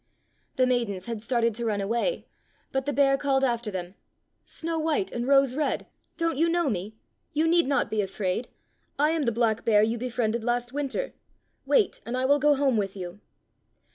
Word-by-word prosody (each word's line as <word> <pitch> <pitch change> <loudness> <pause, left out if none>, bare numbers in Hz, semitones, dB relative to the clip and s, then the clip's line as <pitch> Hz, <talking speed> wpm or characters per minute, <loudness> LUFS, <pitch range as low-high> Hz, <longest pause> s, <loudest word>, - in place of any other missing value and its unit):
The 255 - +3
maidens 235 -7 -1
had 230 -2 -4
started 230 0 +1
to 235 +2 -4
run 210 -2 0
away, 235 - -1 0.5
but 265 +1 -2
the - - +2
bear 275 -1 +3
called 270 -2 +1
after 235 -3 0
them: 185 -2 -5 0.5
"Snow 330 0 -3
white 320 +5 0
and 240 +1 -3
Rose 275 -2 +4
red, 300 0 -1 0.3
don't 330 -4 0
you 335 +1 +3
know 340 -4 +1
me? 205 +2 -4 0.4
You 310 +2 +2
need 340 -2 +4
not 275 -2 +1
be 215 -1 +1
afraid. 195 +3 -2 0.5
I 300 +2 +3
am 320 -3 0
the 235 - +2
black 225 -1 +1
bear 210 -2 +4
you 225 +2 0
befriended 235 -2 -1
last 240 +1 -1
winter. 290 - -2 0.5
Wait, 440 -6 +2
and 240 +2 -3
I 255 - +1
will 285 +2 +4
go 295 +1 +4
home 270 -4 +2
with 195 -2 -1
you." 180 +1 -7
245 Hz, 190 wpm, -27 LUFS, 220-285 Hz, 0.5 s, Rose